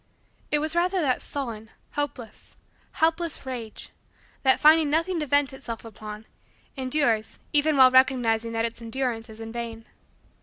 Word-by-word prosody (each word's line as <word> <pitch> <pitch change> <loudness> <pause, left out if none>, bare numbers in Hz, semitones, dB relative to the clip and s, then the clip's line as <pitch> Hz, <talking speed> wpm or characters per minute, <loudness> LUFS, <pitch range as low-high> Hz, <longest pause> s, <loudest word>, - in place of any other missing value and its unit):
It 300 - +2
was 310 +2 0
rather 365 +2 +2
that 270 -7 +1
sullen, 230 -6 -6 0.2
hopeless, 285 -6 -6 0.4
helpless 325 -1 0
rage, 240 -4 -7 0.5
that, 265 -1 +4
finding 310 0 +6
nothing 330 +4 0
to 300 - -2
vent 285 0 +2
itself 235 -4 -7
upon, 215 -1 -9 0.5
endures 255 -5 0 0.2
even 295 0 +3
while 260 -1 +8
recognizing 245 -4 +3
that 225 0 0
its 230 0 -5
endurance 230 -1 -3
is 220 0 -12
in 225 0 -7
vain. 230 -1 -6
260 Hz, 145 wpm, -26 LUFS, 225-295 Hz, 0.5 s, while